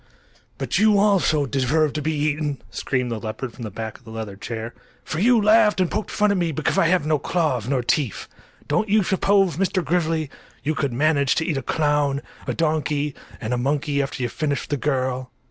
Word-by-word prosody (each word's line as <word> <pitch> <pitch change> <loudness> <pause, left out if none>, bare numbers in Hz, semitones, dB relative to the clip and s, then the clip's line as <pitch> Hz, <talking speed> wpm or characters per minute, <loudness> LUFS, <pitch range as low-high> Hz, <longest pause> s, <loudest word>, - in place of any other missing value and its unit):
"But 135 +5 -1
you 215 -1 +5
also 195 -8 +3
deserve 140 +3 +1
to 155 - -2
be 155 +2 -1
eaten," 150 -1 -1
screamed 125 -3 -1
the 115 - -2
leopard 110 +3 -5
from 125 - -12
the 110 - -4
back 110 +2 -6
of - - -27
the 115 - -13
leather 110 -3 -6
chair; 115 +2 -6 0.3
"for 155 - -4
you 235 +4 +5
laughed 210 -1 +4
and 185 -2 +1
poked 215 +1 -2
fun 210 0 +2
at 200 - +1
me 170 -2 0
because 155 0 -1
I 165 - +4
had 175 -3 +2
no 155 -1 +2
claws 150 - 0
nor 130 -2 0
teeth! 130 -3 -1 0.4
Don't 220 -1 0
you 210 0 +4
suppose 195 -2 +2
Mr. 185 -2 0
Grizzly, 160 -2 0 0.3
you 155 - 0
could 140 -3 -1
manage 140 +1 +2
to 160 - 0
eat 155 -4 -1
a - - -1
clown, 145 0 +1 0.2
a - - 0
donkey 150 -2 0 0.3
and 110 +2 -3
a 125 - 0
monkey 140 +2 0
after 135 -2 -3
you 120 - 0
finish 145 +2 -2
the 145 - -1
girl?" 130 -2 -1
150 Hz, 210 wpm, -23 LUFS, 130-170 Hz, 0.4 s, you